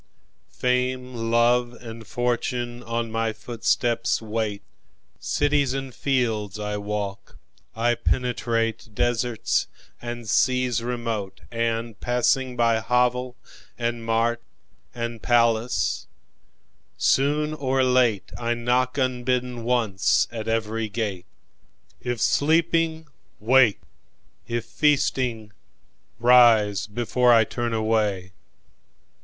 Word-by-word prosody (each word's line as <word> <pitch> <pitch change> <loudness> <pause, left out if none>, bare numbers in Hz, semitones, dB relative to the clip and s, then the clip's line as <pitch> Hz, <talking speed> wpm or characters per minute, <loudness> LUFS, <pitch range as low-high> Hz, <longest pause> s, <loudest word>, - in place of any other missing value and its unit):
Fame, 125 - -1
love, 120 +1 +2
and 115 -2 -10
fortune 120 0 -2
on 115 -1 -3
my 115 0 0
footsteps 115 +1 0
wait. 110 -2 -3 0.6
Cities 145 -2 +1
and 135 -1 -5
fields 115 -8 -1
I 105 0 -3
walk; 100 -1 -5 0.4
I 120 +1 +2
penetrateDeserts 120 -1 -1 0.3
and 120 -1 -6
seas 125 +1 +2
remote, 115 -5 -4
and 115 -1 -2
passing 125 +1 0
byHovel 125 +2 +1 0.4
and 120 -1 -2
mart 115 +1 0 0.5
and 115 -1 -4
palace—soon 115 - -1
or 135 -3 0
lateI 120 -2 +1
knock 125 +2 0
unbidden 125 -2 -1
once 115 -5 +2
at 110 -1 -6
every 115 0 -1
gate!"If 100 - -7
sleeping, 160 +3 +2 0.3
wake—if 120 0 0
feasting, 125 -7 0 0.7
rise 115 -5 +5
beforeI 120 +1 +3
turn 120 -1 -3
away. 105 -4 0
120 Hz, 80 wpm, -24 LUFS, 110-125 Hz, 0.7 s, rise